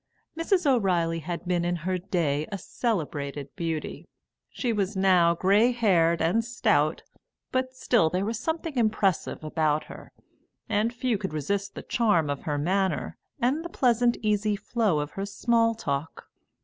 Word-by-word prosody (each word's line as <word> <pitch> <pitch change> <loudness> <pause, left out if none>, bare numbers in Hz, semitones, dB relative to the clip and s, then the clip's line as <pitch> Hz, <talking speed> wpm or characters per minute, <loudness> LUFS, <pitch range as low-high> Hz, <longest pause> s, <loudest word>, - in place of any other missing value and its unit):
Mrs. 350 +2 +1
O'Reilly 180 -11 +2
had 170 +3 -5
been 175 -1 0
in 175 0 0
her 185 -1 0
day 165 -6 -1
a 200 - -2
celebrated 145 - -3
beauty; 165 -2 -4 0.4
she 245 -3 -2
was 200 -1 -1
now 180 -3 +4
grey 205 +7 +4
haired 170 -9 +2
and 210 +8 +2
stout, 240 +2 +1 0.5
but 255 0 -1
still 235 -9 +2
there 185 +4 -1
was 225 +1 -2
something 320 -2 -3
impressive 215 -8 0
about 155 -1 0
her, - - -12 0.6
and 220 +1 +1
few 240 -3 -1
could 190 -5 -4
resist 200 +7 -2
the - - -7
charm 205 -11 +2
of 140 - -5
her 150 -2 -1
manner 190 +6 0 0.2
and 265 +6 +1
the 345 - -6
pleasant 245 -5 +2
easy 210 0 +1
flow 210 -3 0
of 145 0 -4
her 195 - -4
small 230 +2 +2
talk. 145 -6 -4
195 Hz, 155 wpm, -26 LUFS, 165-230 Hz, 0.6 s, now